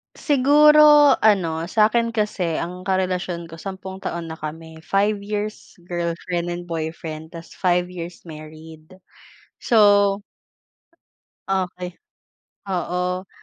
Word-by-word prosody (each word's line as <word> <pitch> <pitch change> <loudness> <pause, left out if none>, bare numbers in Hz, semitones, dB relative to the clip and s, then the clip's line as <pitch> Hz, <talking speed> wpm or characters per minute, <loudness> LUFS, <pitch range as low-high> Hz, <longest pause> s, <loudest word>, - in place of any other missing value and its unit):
Siguro 295 0 +6
ano, 170 -6 +2
sa 215 +3 +3
akin 230 0 0
kasi 195 -6 -1
ang 180 +3 -5
karelasyon 180 -3 -2
ko 165 - -10
10 190 0 -7
taon 170 -3 -5
na 160 - -7
kami, 160 +1 -8
5 200 +5 0
years 210 +1 -5
girlfriend 175 0 -3
and 175 0 -9
boyfriend 160 0 -5
tas 165 +1 -10
5 180 -1 0
years 175 -1 -8
married. 155 +1 -12 0.7
So 205 -2 +4 1.3
Okey. 180 -2 -2 0.8
Oo. 180 +1 -2
180 Hz, 105 wpm, -22 LUFS, 165-205 Hz, 1.3 s, Siguro